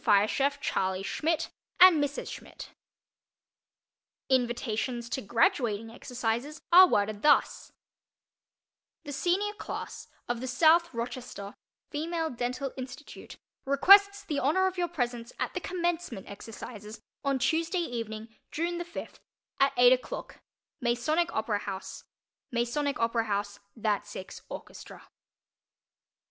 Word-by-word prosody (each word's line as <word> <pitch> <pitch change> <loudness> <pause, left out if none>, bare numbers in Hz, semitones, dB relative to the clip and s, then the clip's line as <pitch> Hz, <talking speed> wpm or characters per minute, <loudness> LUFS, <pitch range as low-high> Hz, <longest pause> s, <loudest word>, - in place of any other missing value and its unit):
Fire 205 -2 +5
Chief 280 +4 0
CHARLEY 190 -6 -1
SCHMIDT 320 +9 -1 0.3
and 355 -5 +8
Mrs. 285 0 -3
SCHMIDT - - -9 1.6
Invitations 240 -1 0
to 265 - -2
graduating 225 - +1
exercises 245 +5 -3
are 365 +2 +10
worded 205 - 0
thus: 295 - +3 1.3
THE 290 - -7
SENIOR 360 +9 0
CLASS - - -6 0.2
of 240 -1 -2
the 260 - -4
SOUTH 325 +6 +4
ROCHESTER 235 -4 -6 0.4
FEMALE 325 +2 -2
DENTAL 250 +2 -3
INSTITUTE 265 +3 -9 0.3
requests 400 +8 +6
the 295 -6 -1
honor 315 +8 +2
of 375 0 0
your 355 -1 0
presence 245 -7 -3
at - - -2
the 365 - -2
Commencement 345 - -3
Exercises 215 +1 -9 0.2
on 275 -1 +1
Tuesday 325 +8 +1
evening, 230 -8 -4 0.2
June 340 +2 -2
the 345 - -4
fifth 340 - -8 0.4
at 275 0 +4
eight 245 +1 +8
o'clock 255 - -5 0.4
MASONIC 255 +8 +1
OPERA 220 -1 -1
HOUSE 195 -2 -6 0.5
_"That 225 -5 -1
Six" 190 - -8
Orchestra. - - -10
255 Hz, 110 wpm, -29 LUFS, 225-325 Hz, 1.6 s, are